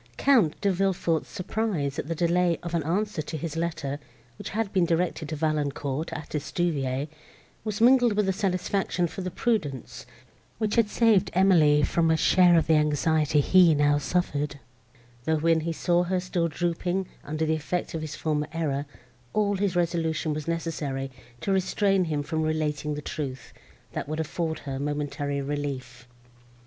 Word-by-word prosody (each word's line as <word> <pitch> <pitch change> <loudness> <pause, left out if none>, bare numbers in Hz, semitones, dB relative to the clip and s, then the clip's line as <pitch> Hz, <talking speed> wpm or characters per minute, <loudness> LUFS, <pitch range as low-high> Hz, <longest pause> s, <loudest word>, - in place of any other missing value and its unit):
Count 230 - +3
De 200 - +2
Villefort's 180 -3 0
surprise 180 -8 -2
at - - -4
the 165 - -2
delay 175 0 +2
of 170 -1 -5
an 170 - +1
answer 185 +3 -1
to 155 +1 -5
his 160 0 -5
letter, 155 -4 -2 0.4
which - - -6
had 215 -1 -2
been 185 -3 +3
directed 170 -2 0
to 155 - -3
Valancourt, 150 -1 -1
at 155 -2 -6
Estuvière, 140 -2 -1 0.6
was 210 -1 -3
mingled 245 -1 +5
with 200 -2 +1
satisfaction 185 -1 0
for 175 +3 -5
the 185 - -3
prudence, 165 - -2 0.5
which 215 -1 -1
had 230 -3 +3
saved 210 -4 +3
Emily 160 -6 +5
from 165 +3 +2
a 160 - +3
share 175 +2 +5
of 165 - +3
the 160 - +3
anxiety 150 0 +2
he 175 0 +5
now 145 0 +3
suffered, 145 -2 -1 0.7
though, 160 +1 +2
when 165 +1 +3
he 165 +1 -2
saw 175 +2 +1
her 180 +1 0
still 180 -2 -1
drooping 175 +3 -1 0.2
under 155 +2 -2
the 160 - +1
effect 160 +3 -2
of 160 - -3
his 155 -1 -5
former 150 -1 -1
error, 145 -3 -1 0.5
all 205 -1 +2
his 195 -2 0
resolution 165 -2 0
was 150 0 -5
necessary 150 -5 -3 0.3
to 195 - -1
restrain 195 0 +2
him 150 -3 -1
from 160 +2 -2
relating 155 -1 -1
the 150 - -6
truth, 130 -6 -5 0.4
that - - -5
would 155 +1 -3
afford 160 0 -2
her 135 -1 -3
a - - -5
momentary 145 -1 -2
relief. 135 -4 -5
160 Hz, 165 wpm, -26 LUFS, 150-180 Hz, 0.7 s, mingled